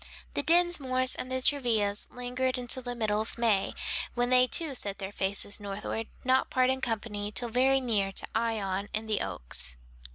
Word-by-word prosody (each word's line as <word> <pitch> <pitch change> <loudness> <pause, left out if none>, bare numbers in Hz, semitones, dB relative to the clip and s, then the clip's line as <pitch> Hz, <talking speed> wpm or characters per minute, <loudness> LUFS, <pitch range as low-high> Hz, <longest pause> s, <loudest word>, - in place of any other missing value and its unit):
The - - +1
Dinsmores 285 -7 +3
and 255 - -4 0.2
Travillas 220 -7 +1
lingered 250 +1 -2
until 250 +1 0
the 245 -1 -4
middle 215 -2 0
of 220 - -6
May, 225 -5 +1 0.4
when 245 +1 0
they 255 0 +6
too 315 +1 +2
set 200 -6 -4
their 195 0 -6
faces 200 +1 0
northward, 205 +2 -4 0.2
not 260 +1 +2
parting 260 +1 +2
company 210 -3 -3
till 240 +2 -1
very 260 +3 +3
near 210 -6 0
to - - 0
Ion 205 -4 -1
and 220 +1 -3
the 215 -1 0
Oaks. 60 +1 +1
235 Hz, 165 wpm, -29 LUFS, 205-255 Hz, 0.4 s, they